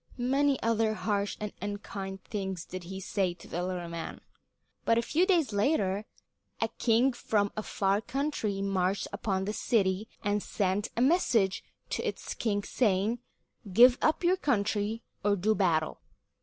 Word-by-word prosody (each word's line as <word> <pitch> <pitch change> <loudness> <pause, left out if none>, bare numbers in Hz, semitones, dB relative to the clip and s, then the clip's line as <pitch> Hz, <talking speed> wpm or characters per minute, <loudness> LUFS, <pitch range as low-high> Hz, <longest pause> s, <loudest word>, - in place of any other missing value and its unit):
Many 270 +2 +2
other 225 -1 +2
harsh 205 -2 -1
and 210 -1 -4
unkind 200 -1 -5
things 190 -4 -4
did 185 -1 -7
he 190 +2 -6
say 190 -2 -1
to 175 - -14
the 175 - -3
little 180 -1 -3
man. 170 -1 -6 0.6
But 230 - +3
a 235 - +2
few 345 +9 +2
days 330 - +3
later 205 -3 +1 0.5
a 225 - +1
king 245 +3 +3
from 205 -4 0
a 215 - -2
far 200 -1 0
country 225 -8 -2
marched 195 0 0
upon 195 -2 -1
the 210 - -2
city 200 -2 +1 0.2
and 205 +1 +1
sent 200 +1 0
a - - +2
message 245 - +3 0.3
to - - -1
its - - -4
king 205 -3 -1
saying, 215 +1 +1 0.5
"Give 245 +6 +7
up 315 +3 +2
your 360 +2 +4
country, 220 - 0 0.2
or 205 0 +3
do 205 +3 +2
battle." 165 -6 +1
205 Hz, 155 wpm, -30 LUFS, 190-230 Hz, 0.6 s, Give